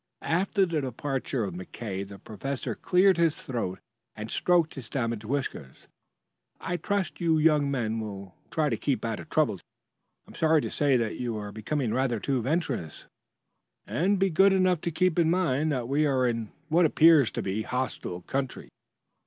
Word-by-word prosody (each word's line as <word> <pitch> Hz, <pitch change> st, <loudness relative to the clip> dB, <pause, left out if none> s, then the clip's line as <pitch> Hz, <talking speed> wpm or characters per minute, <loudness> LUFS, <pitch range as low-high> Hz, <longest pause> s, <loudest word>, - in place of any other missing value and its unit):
After 195 Hz, +4 st, +2 dB
the 165 Hz, -4 st, -1 dB
departure 135 Hz, -1 st, -2 dB
of 95 Hz, -4 st, -4 dB
McKay 95 Hz, +2 st, -6 dB
the 100 Hz, 0 st, -10 dB
professor 125 Hz, +7 st, -5 dB
cleared 185 Hz, +1 st, +3 dB
his 165 Hz, -2 st, +3 dB
throat 115 Hz, -8 st, -3 dB, 0.4 s
and 110 Hz, +1 st, -6 dB
stroked 175 Hz, -3 st, +2 dB
his 130 Hz, -5 st, -9 dB
damaged 115 Hz, -4 st, -2 dB
whiskers. 120 Hz, -, -4 dB, 0.7 s
"I 180 Hz, -1 st, -3 dB
trust 195 Hz, +1 st, -2 dB
you 165 Hz, -2 st, +3 dB
young 150 Hz, -2 st, +3 dB
men 115 Hz, -5 st, -1 dB
will 100 Hz, -4 st, -7 dB, 0.2 s
try 155 Hz, -2 st, +1 dB
to 115 Hz, -, -1 dB
keep 135 Hz, -1 st, -1 dB
out 115 Hz, -2 st, -2 dB
of -, -, -10 dB
trouble 155 Hz, -12 st, +2 dB
to -, -, -22 dB
day. -, -, -50 dB, 0.6 s
I -, -, -13 dB
am -, -, -15 dB
sorry 160 Hz, -1 st, +3 dB
to -, -, -4 dB
say 140 Hz, -3 st, +3 dB
that 115 Hz, -2 st, -2 dB
you 120 Hz, -3 st, -2 dB
are 105 Hz, -1 st, -6 dB
becoming 110 Hz, +3 st, -2 dB
rather 130 Hz, -3 st, 0 dB
too 130 Hz, +2 st, 0 dB
venturesome. 130 Hz, -, -2 dB, 1.1 s
Be 190 Hz, 0 st, +2 dB
good 195 Hz, +5 st, +5 dB
enough 185 Hz, -3 st, +2 dB
to -, -, -1 dB
keep 180 Hz, +1 st, +1 dB
in 165 Hz, -1 st, +4 dB
mind 160 Hz, -4 st, +1 dB
that 125 Hz, -4 st, -2 dB
we 145 Hz, +3 st, +2 dB
are 130 Hz, -2 st, +2 dB
in 115 Hz, -3 st, -2 dB, 0.2 s
what 165 Hz, +2 st, +4 dB
appears 155 Hz, -5 st, +6 dB
to -, -, -3 dB
be 95 Hz, +2 st, -2 dB
a -, -, -13 dB
hostile 125 Hz, -8 st, -3 dB
country." 135 Hz, +4 st, -3 dB
135 Hz, 185 wpm, -27 LUFS, 115-160 Hz, 1.1 s, appears